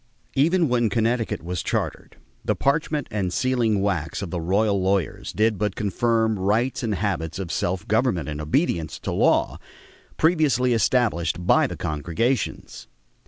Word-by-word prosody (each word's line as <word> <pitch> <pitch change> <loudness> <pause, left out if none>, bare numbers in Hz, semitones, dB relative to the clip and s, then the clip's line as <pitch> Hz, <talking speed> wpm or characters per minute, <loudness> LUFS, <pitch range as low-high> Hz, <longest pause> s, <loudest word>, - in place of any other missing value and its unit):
Even 165 +5 +3
when 120 -3 +2
Connecticut 115 0 0
was 90 0 -3
chartered, - - -3 0.3
the - - 0
parchment 150 0 0
and 95 -4 -1
sealing 115 -3 +1
wax 95 -2 -2
of 90 - -6
the 85 - -2
royal 100 +3 +1
lawyers 95 -3 -1
did 110 -1 +1
but 105 -2 -1
confirm 110 +1 0
rights 110 +8 +1
and 110 -4 -1
habits 90 -5 -2
of 95 -4 -4
self 90 0 -2
government 110 - +1
and 75 0 -4
obedience 80 - 0
to - - -5
law - - +2 0.6
previously 145 -7 +3
established 95 - +1
by - - +4
the - - -7
congregations. 85 - -2
105 Hz, 145 wpm, -24 LUFS, 90-125 Hz, 0.6 s, by